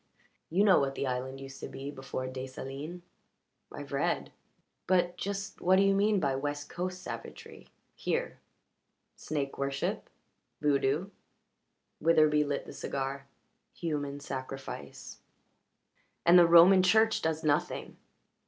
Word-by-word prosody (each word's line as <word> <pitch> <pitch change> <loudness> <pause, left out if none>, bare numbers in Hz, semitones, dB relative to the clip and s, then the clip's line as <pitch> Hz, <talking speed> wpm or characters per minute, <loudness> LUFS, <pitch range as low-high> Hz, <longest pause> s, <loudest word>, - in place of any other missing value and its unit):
You 185 +5 +3
know 195 -3 +6
what 135 -1 -1
the - - -2
island 130 +1 -3
used 135 0 -9
to - - -6
be 140 +1 -7
before 135 -2 -5
Desalines." 135 +6 -7 0.7
"I've - - -9
read. - - -1 0.6
But 175 -1 +2
just 200 0 -5
what 185 +2 +4
do 195 - +5
you 195 0 +4
mean 205 +1 +3
by 140 -5 0
West 145 +1 -4
Coast 185 +1 -4
savagery 455 -1 -9 0.3
here?" - - -2 0.8
"Snake 140 -3 -4
worship. 140 0 -2 0.5
Voodoo." 145 +5 +1 0.9
Witherbee 155 -2 +4
lit 145 -1 -2
the - - -9
cigar 135 0 -4 0.5
"Human 145 -4 -3
sacrifice." 135 - -7 1.1
"And 175 +1 +8
the 170 - +7
Roman 175 +3 +8
Church 220 +4 +4
does 160 0 -1
nothing!" 145 -2 -1
150 Hz, 125 wpm, -30 LUFS, 135-185 Hz, 1.1 s, And